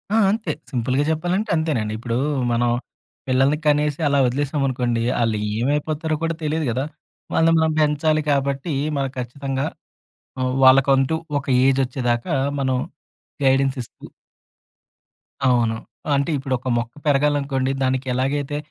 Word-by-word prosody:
ఆ! -, -, +4 dB
అంతే. 225 Hz, +1 st, -2 dB, 0.2 s
సింపుల్‌గా 130 Hz, +3 st, 0 dB
చెప్పాలంటే, 180 Hz, +7 st, -1 dB
అంతేనండి. 140 Hz, -10 st, -1 dB
ఇప్పుడు 115 Hz, +1 st, -3 dB, 0.4 s
మనం 120 Hz, +1 st, +2 dB, 0.6 s
పిల్లల్ని 135 Hz, +3 st, +3 dB
కనేసి, 150 Hz, +1 st, +2 dB
అలా 140 Hz, -1 st, +2 dB
వదిలేసామనుకోండి. 130 Hz, -3 st, -1 dB, 0.2 s
వాళ్ళు 115 Hz, -3 st, +1 dB, 0.2 s
ఏమైపోతారో 150 Hz, +4 st, -1 dB
కూడా 165 Hz, 0 st, 0 dB
తెలీదు 155 Hz, 0 st, -1 dB
కదా! 130 Hz, +4 st, -1 dB, 0.5 s
వాళ్ళని 165 Hz, 0 st, +4 dB
మనం 160 Hz, 0 st, +2 dB
పెంచాలి 155 Hz, +1 st, +2 dB
కాబట్టి, 140 Hz, +3 st, -1 dB, 0.2 s
మనం 135 Hz, -1 st, -1 dB
ఖచ్చితంగా 135 Hz, +2 st, -3 dB, 0.8 s
ఆహ్, 130 Hz, 0 st, 0 dB
వాళ్ళకంటూ 135 Hz, +2 st, +5 dB, 0.2 s
ఒక 140 Hz, -, -5 dB, 0.2 s
ఏజ్ 135 Hz, 0 st, +3 dB
వచ్చేదాకా 125 Hz, +2 st, -2 dB, 0.3 s
మనం 130 Hz, -1 st, +1 dB, 0.7 s
గైడెన్స్ 135 Hz, 0 st, +3 dB
ఇస్తూ 115 Hz, -, -12 dB, 1.4 s
అవును. 120 Hz, -3 st, +2 dB, 0.4 s
అంటే, 140 Hz, +3 st, 0 dB
ఇప్పుడు 135 Hz, 0 st, -3 dB
ఒక 130 Hz, -, -9 dB
మొక్క 120 Hz, 0 st, -3 dB
పెరగాలనుకోండి 140 Hz, -2 st, +1 dB
దానికి 130 Hz, 0 st, 0 dB
ఎలాగైతే 140 Hz, +3 st, -1 dB
135 Hz, 120 wpm, -22 LUFS, 130-150 Hz, 1.4 s, వాళ్ళకంటూ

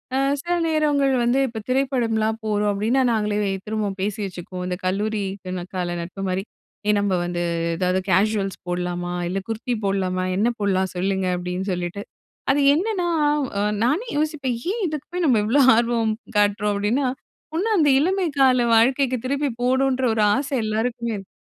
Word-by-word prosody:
அ -, -, +2 dB, 0.2 s
சில 345 Hz, +1 st, -2 dB
நேரங்கள் 295 Hz, -4 st, +2 dB
வந்து 245 Hz, +3 st, +2 dB
இப்போ 225 Hz, -2 st, -6 dB
திரைப்படம்லாம் 235 Hz, -5 st, +1 dB
போறோம் 210 Hz, -1 st, +1 dB
அப்டின்னா, 230 Hz, +7 st, +1 dB
நாங்களே 210 Hz, -1 st, 0 dB, 0.3 s
திரும்ப 215 Hz, -2 st, -1 dB
பேசி 205 Hz, +2 st, -2 dB
வச்சுக்குவோம். 180 Hz, -1 st, -6 dB
இந்த 180 Hz, 0 st, -2 dB
கல்லூரி 205 Hz, +3 st, 0 dB, 0.2 s
கன 185 Hz, -1 st, -4 dB
கால 175 Hz, -1 st, -2 dB
நட்பு 185 Hz, +3 st, -7 dB
மாரி 185 Hz, +1 st, -1 dB, 0.4 s
"ஏ -, -, +5 dB
நம்ம 200 Hz, -1 st, 0 dB
வந்து 175 Hz, 0 st, -2 dB, 0.4 s
ஏதாவது 180 Hz, +1 st, +1 dB
கேசுவல்ஸ் 195 Hz, +1 st, +1 dB
போடலாமா? 175 Hz, 0 st, -2 dB, 0.2 s
இல்ல 190 Hz, +2 st, -1 dB
குர்தி 230 Hz, +2 st, -2 dB
போடலாமா? 185 Hz, -2 st, 0 dB
என்ன 215 Hz, +4 st, +2 dB
போடலாம்? 190 Hz, -2 st, +1 dB
சொல்லுங்க." 190 Hz, +1 st, 0 dB
அப்டின்னு 180 Hz, +2 st, -3 dB
சொல்லிட்டு. 180 Hz, +3 st, -4 dB, 0.5 s
அது 285 Hz, -, +2 dB
என்னன்னா, 370 Hz, +1 st, 0 dB, 0.8 s
நானே 305 Hz, -, +1 dB
யோசிப்பேன், 295 Hz, -5 st, -1 dB
ஏன் 450 Hz, 0 st, -2 dB
இதுக்கு 300 Hz, -2 st, -5 dB
போய் 355 Hz, -1 st, 0 dB
நம்ம 250 Hz, -7 st, +4 dB
இவ்ளோ 260 Hz, +7 st, +3 dB, 0.2 s
ஆர்வம் 230 Hz, -2 st, +1 dB, 0.2 s
காட்டுறோம். 205 Hz, 0 st, +2 dB
அப்டின்னா 230 Hz, +7 st, +1 dB, 0.5 s
ஒண்ணு 370 Hz, +7 st, 0 dB
அந்த 300 Hz, -4 st, +4 dB
இளமை 370 Hz, +5 st, +1 dB
கால 260 Hz, -2 st, +5 dB
வாழ்க்கைக்கு 255 Hz, +3 st, +3 dB
திருப்பி 280 Hz, +2 st, 0 dB
போணும்ன்ற 260 Hz, +1 st, +2 dB
ஒரு 220 Hz, -, +1 dB
ஆசை 275 Hz, +1 st, -2 dB
எல்லாருக்குமே 230 Hz, +2 st, -1 dB
இருக்கு. 195 Hz, -2 st, -8 dB
220 Hz, 155 wpm, -23 LUFS, 195-270 Hz, 0.8 s, ஏ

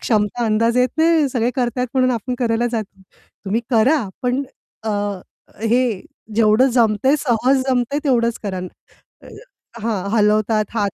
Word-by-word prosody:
क्षमता 215 Hz, +1 st, 0 dB
अंदाज 230 Hz, +2 st, +1 dB
येत 250 Hz, 0 st, +3 dB
नाही. 320 Hz, -3 st, +3 dB
सगळे 240 Hz, -2 st, 0 dB
करतायेत 250 Hz, 0 st, -1 dB
म्हणून 255 Hz, -1 st, +3 dB
आपण 245 Hz, +1 st, -2 dB
करायला 235 Hz, -1 st, 0 dB
जातो. 215 Hz, -4 st, -5 dB, 0.4 s
तुम्ही 210 Hz, +4 st, 0 dB
करा 240 Hz, +1 st, +3 dB
पण 250 Hz, +2 st, 0 dB, 0.4 s
अ, 220 Hz, -, -1 dB, 0.7 s
हे 235 Hz, +3 st, +2 dB, 0.5 s
जेवढं 225 Hz, +4 st, +4 dB
जमतंय, 230 Hz, +3 st, +3 dB
सहज 260 Hz, +1 st, +1 dB
जमतंय 255 Hz, +3 st, 0 dB
तेवढंच 235 Hz, -4 st, +1 dB
करा." 195 Hz, -3 st, -4 dB
अ, 180 Hz, -, -5 dB, 0.6 s
हं. -, -, -12 dB, 0.4 s
हां, 215 Hz, -5 st, -1 dB
हलवतात 215 Hz, 0 st, +2 dB
हात 205 Hz, -3 st, 0 dB
235 Hz, 145 wpm, -19 LUFS, 215-255 Hz, 0.7 s, जेवढं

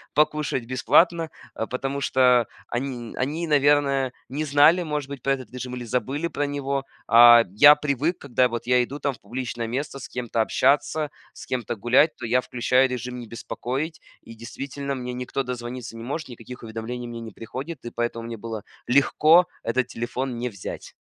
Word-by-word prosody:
покушать 150 Hz, -4 st, +1 dB
бесплатно, 160 Hz, +7 st, +3 dB, 0.2 s
а 110 Hz, -, -4 dB
потому 135 Hz, +2 st, -3 dB
что 125 Hz, -4 st, +4 dB, 0.2 s
они 120 Hz, -2 st, -4 dB
они, 150 Hz, +6 st, -2 dB
наверное, 140 Hz, -3 st, +3 dB, 0.2 s
не 145 Hz, +4 st, -3 dB
знали, 150 Hz, +5 st, +5 dB
может 150 Hz, -4 st, -3 dB
быть, 140 Hz, -3 st, -7 dB
про 135 Hz, -, +2 dB
этот 130 Hz, -5 st, -7 dB
режим 125 Hz, 0 st, -5 dB
или 125 Hz, -, -6 dB
забыли 135 Hz, +7 st, -1 dB
про 145 Hz, -3 st, -2 dB
него. 140 Hz, -1 st, -2 dB, 0.2 s
А 120 Hz, 0 st, +9 dB
я 145 Hz, +9 st, +8 dB
привык, 150 Hz, +3 st, -1 dB
когда 125 Hz, -2 st, +1 dB
вот 120 Hz, -1 st, -4 dB
я 125 Hz, 0 st, +4 dB
иду 140 Hz, +4 st, -7 dB
там 140 Hz, -, -1 dB
в -, -, -17 dB
публичное 120 Hz, +1 st, -4 dB
место 135 Hz, +3 st, -4 dB
с 135 Hz, -, -9 dB
кем-то 120 Hz, -2 st, -2 dB
общаться, 145 Hz, +5 st, +1 dB, 0.2 s
с -, -, -11 dB
кем-то 120 Hz, -2 st, -3 dB
гулять, 125 Hz, +9 st, +3 dB
то 125 Hz, -, -6 dB
я 125 Hz, +2 st, +2 dB
включаю 125 Hz, +2 st, +2 dB
режим 125 Hz, 0 st, -5 dB
"Не 120 Hz, -, -8 dB
беспокоить", 130 Hz, +7 st, -4 dB, 0.2 s
и 115 Hz, -, -11 dB
действительно 135 Hz, +4 st, -5 dB
мне 125 Hz, -1 st, -5 dB
никто 125 Hz, +2 st, -3 dB
дозвониться 120 Hz, -1 st, -6 dB
не 115 Hz, -, -8 dB
может, 145 Hz, +4 st, -4 dB
никаких 120 Hz, +1 st, -10 dB
уведомлений 115 Hz, +2 st, -5 dB
мне 120 Hz, -1 st, -7 dB
не 115 Hz, -1 st, -8 dB
приходит, 130 Hz, +8 st, -7 dB
и 120 Hz, -, -5 dB
поэтому 120 Hz, -1 st, -3 dB
мне 115 Hz, -1 st, -6 dB
было 110 Hz, -1 st, -6 dB, 0.2 s
легко 155 Hz, +6 st, +5 dB, 0.2 s
этот 125 Hz, +2 st, 0 dB
телефон 125 Hz, +1 st, -4 dB
не 125 Hz, +1 st, -2 dB
взять. 100 Hz, -4 st, -8 dB
125 Hz, 180 wpm, -24 LUFS, 120-140 Hz, 0.2 s, А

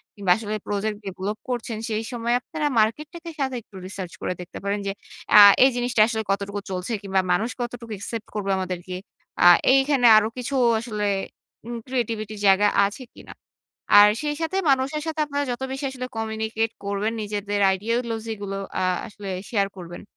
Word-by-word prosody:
কিংবা 195 Hz, -3 st, 0 dB
আসলে 215 Hz, -1 st, -4 dB
project 205 Hz, +1 st, -2 dB
develop 195 Hz, +3 st, -4 dB
করছেন, 240 Hz, -2 st, -3 dB
সেই 220 Hz, 0 st, -1 dB
সময় 235 Hz, 0 st, -1 dB
আপনারা 305 Hz, +2 st, -3 dB
মার্কেটটাকে 300 Hz, +10 st, -1 dB
সাথে 265 Hz, -2 st, -1 dB
একটু 205 Hz, -, -21 dB
রিসার্চ 190 Hz, -3 st, -7 dB
করে -, -, -1 dB
দেখতে 175 Hz, -, -9 dB
পারেন। 200 Hz, +1 st, -1 dB
যে -, -, 0 dB, 0.5 s
আ -, -, +12 dB, 0.2 s
এই 265 Hz, -, +7 dB
জিনিসটা 245 Hz, -2 st, +1 dB
আসলে 220 Hz, -1 st, -2 dB
কতটুকু 200 Hz, +1 st, -2 dB
চলছে? 180 Hz, +5 st, -4 dB
কিংবা 190 Hz, -1 st, +1 dB
মানুষ 220 Hz, +6 st, 0 dB
কতটুকু 240 Hz, -1 st, -6 dB
একসেপ্ট 220 Hz, +2 st, -6 dB
করবে 200 Hz, -2 st, -1 dB
আমাদেরকে? 185 Hz, -1 st, -4 dB, 0.5 s
আ -, -, +6 dB, 0.3 s
এইখানে 270 Hz, -2 st, +3 dB
আরো 215 Hz, -, +3 dB
কিছু 260 Hz, +3 st, -3 dB, 0.2 s
আসলে 215 Hz, -3 st, -3 dB, 0.6 s
উম 240 Hz, -, -4 dB
creativity 225 Hz, -4 st, -2 dB
র -, -, -9 dB
জায়গা 200 Hz, +2 st, +5 dB, 0.2 s
আছে 210 Hz, +7 st, -5 dB
কিনা? -, -, -12 dB, 0.7 s
আর 205 Hz, 0 st, +9 dB
সেই 295 Hz, -1 st, -2 dB
সাথে 325 Hz, +4 st, -1 dB
মানুষের 270 Hz, +3 st, 0 dB
সাথে 315 Hz, -1 st, -3 dB
আপনারা 285 Hz, 0 st, -2 dB
যত 245 Hz, +2 st, -5 dB
বেশি 270 Hz, +1 st, -4 dB
আসলে 255 Hz, -1 st, -5 dB
communicate 220 Hz, 0 st, -2 dB
করবেন, 200 Hz, +2 st, -1 dB
নিজেদের 205 Hz, 0 st, -3 dB, 0.2 s
ideology 230 Hz, +2 st, -2 dB
গুলো 195 Hz, -1 st, -4 dB, 0.3 s
আ -, -, +1 dB, 0.2 s
আসলে 205 Hz, -1 st, -9 dB, 0.2 s
শেয়ার 200 Hz, -4 st, +1 dB
করবেন। 175 Hz, -1 st, -9 dB
220 Hz, 170 wpm, -24 LUFS, 200-245 Hz, 0.7 s, আ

